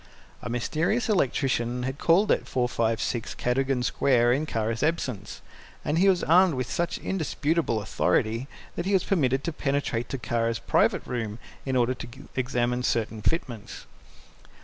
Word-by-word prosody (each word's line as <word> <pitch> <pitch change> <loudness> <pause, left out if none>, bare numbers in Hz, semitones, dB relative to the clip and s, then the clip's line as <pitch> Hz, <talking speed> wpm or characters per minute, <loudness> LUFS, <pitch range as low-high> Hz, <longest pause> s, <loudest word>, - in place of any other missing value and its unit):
A - - -5
mysterious 160 - 0
electrician 125 - +1
had 130 +2 -3
called 185 +5 +4
at - - +1
456 115 -2 -1
Cadogan 130 +1 0
Square 120 -2 +3
in 150 +4 -1
Kara's 115 -3 -1
absence, 130 -10 -2 0.4
and 155 +3 +1
he 195 +2 +5
was 185 -2 +2
armed 180 -1 +5
with 130 -2 -3
such 170 0 -1
indisputable 160 - -1
authority 115 +5 0 0.3
that 175 - -3
he 200 - +1
was 190 - +3
permitted 135 -7 +1
to 170 - -2
penetrate 135 -5 -1
to 135 - -3
Kara's 115 0 -1
private - - +1
room, 115 -4 -3 0.3
in 130 - 0
order 125 0 +3
to 125 - -8 0.3
examine 125 -1 0
certain 115 -3 -1
fitments. 120 - -3
130 Hz, 150 wpm, -26 LUFS, 120-155 Hz, 0.4 s, he